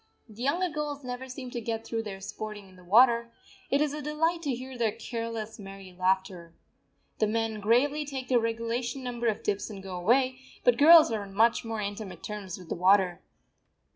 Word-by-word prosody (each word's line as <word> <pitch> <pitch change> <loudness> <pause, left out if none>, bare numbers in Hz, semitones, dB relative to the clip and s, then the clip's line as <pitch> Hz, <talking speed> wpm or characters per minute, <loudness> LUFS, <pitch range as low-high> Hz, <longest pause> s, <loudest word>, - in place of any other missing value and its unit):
The 220 +1 -12
younger 330 +8 +1
girls 295 -3 -4
never 250 +1 -6
seem 255 -1 -7
to 240 - -4
get 225 0 -3
through 225 -1 -2
their 200 -3 -7
sporting 210 0 -7
in 185 - -18
the 180 - -16
water; 235 +4 +5 0.4
it 280 - +2
is 300 -1 +1
a 300 - -4
delight 325 +3 0
to 280 -6 -1
hear 260 +1 -8
their 230 -3 +1
careless, 230 -1 -5
merry 195 -2 -10
laughter. 185 -2 -1 0.6
The 215 - +3
men 225 0 -1
gravely 255 +8 +2
take 270 -3 -6
their 250 -2 +4
regulation 230 +3 -2
number 240 -1 -2
of 220 +1 -1
dips 205 -1 -1
and 200 -3 -9
go 190 -1 -6
away, 255 +8 +2 0.2
but 245 -1 +4
girls 315 -1 +8
are 220 -2 -1
on 195 -1 -10
much 230 +3 +3
more 225 -2 -4
intimate 205 -1 -6
terms 205 -4 -6
with 180 -3 -13
the - - -1
water. 185 0 +3
230 Hz, 200 wpm, -28 LUFS, 205-255 Hz, 0.6 s, girls